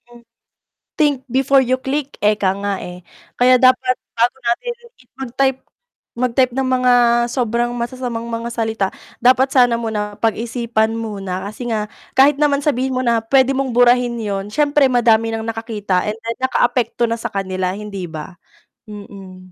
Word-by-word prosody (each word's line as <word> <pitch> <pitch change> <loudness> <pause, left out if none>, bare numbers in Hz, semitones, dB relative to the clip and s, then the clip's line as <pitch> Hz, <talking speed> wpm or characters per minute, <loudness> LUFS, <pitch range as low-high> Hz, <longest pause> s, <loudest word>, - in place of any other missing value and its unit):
Hmm. 240 0 -16 0.8
Think 285 -4 +1
before 270 +2 +3
you 255 0 +1
click, 275 +2 -4
ika 210 -2 +2
nga, 200 0 -2
eh. 180 0 -9 0.3
Kaya 250 0 +5
dapat 255 0 +4 0.2
bago 235 +3 +2
natin 240 - -1 0.2
i 250 - -22 0.2
mag-type 265 +1 0 0.6
mag-type 250 +1 +2
ng 265 - +1
mga 255 -1 +3 0.4
sobrang 240 -1 0
masasamang 240 -1 -4
mga 230 0 -4
salita, 220 -4 -1 0.3
dapat 255 +2 +4
sana 245 -3 +4
muna 210 -3 -4
pag-isipan 225 0 -1
muna 195 -4 -5
kasi 225 +4 -6
nga 215 -2 -1 0.3
kahit 280 +2 +5
naman 290 -1 +3
sabihin 265 -3 +1
mo 255 - -1
na 235 -1 +2
pwede 270 0 +4
mong 270 0 -1
burahin 245 0 +3
yun, 205 -3 -3
siyempre 290 +3 +2
madami 230 -2 +3
ng 225 0 -4
nakakita 220 -5 -2
and 215 - -4
then 230 +1 -5
nakaapekto 240 -2 +1
na 230 0 -3
sa - - -3
kanila, 185 -2 -2
hindi 200 -4 -6
ba? 155 +3 -8 0.5
Mm. 195 -3 -11
235 Hz, 155 wpm, -18 LUFS, 215-255 Hz, 0.8 s, Kaya